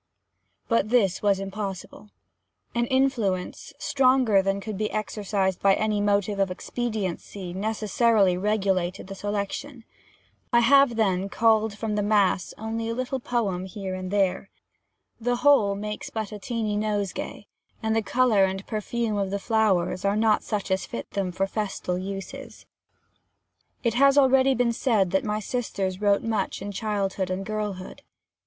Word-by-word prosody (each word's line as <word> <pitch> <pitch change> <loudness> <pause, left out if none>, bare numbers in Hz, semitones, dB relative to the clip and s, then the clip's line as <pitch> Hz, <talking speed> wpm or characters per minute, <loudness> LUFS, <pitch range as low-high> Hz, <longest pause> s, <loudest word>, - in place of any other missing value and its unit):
But 230 -3 +1
this 210 -7 +2
was 200 -2 +2
impossible: 195 +1 -6 0.6
an 235 0 0
influence, 245 -7 0
stronger 260 -8 +3
than 195 +1 -1
could 215 +1 -5
be 215 +2 -1
exercised 205 -3 -2
by 195 -1 +5
any 215 -1 0
motive 205 0 +1
of 195 -1 +2
expediency, 195 -3 -4
necessarily 215 -1 +2
regulated 190 -2 0
the 195 - -8
selection. 205 +6 -4 0.7
I 235 -1 +5
have, 275 0 +5
then, 195 -3 +1
culled 220 -1 +2
from 220 0 -2
the 210 - 0
mass 205 -3 +2
only 225 +1 -3
a 230 - -2
little 255 +1 -2
poem 210 -7 -1
here 190 0 -6
and 185 0 -5
there. 195 -1 0 0.7
The 245 +1 0
whole 240 -7 +4
makes 210 +1 -5
but 220 -2 -4
a 210 - -7
tiny 220 -1 -2
nosegay, 205 -2 -3 0.4
and 220 0 +1
the 225 - +2
colour 230 -3 +3
and 190 +1 -4
perfume 220 0 -2
of 195 -1 -1
the 200 - -1
flowers 200 -4 +1
are 200 +1 +1
not 215 -1 +3
such 205 -3 -3
as 190 -1 0
fit 115 - -7
them 195 -2 -2
for 190 +2 0
festal 195 -3 -3
uses. 195 +1 -7 1.2
It 235 -2 +1
has 275 +3 +5
been 285 - +7
already 260 -2 +3
said 220 -6 +1
that 190 - +1
my 210 0 -1
sisters 200 -4 -3
wrote 200 -1 +3
much 220 -4 -1
in 200 +1 -5
childhood 195 -2 -2
and 185 +1 -3
girlhood. 210 -3 -4
210 Hz, 150 wpm, -25 LUFS, 195-225 Hz, 1.2 s, been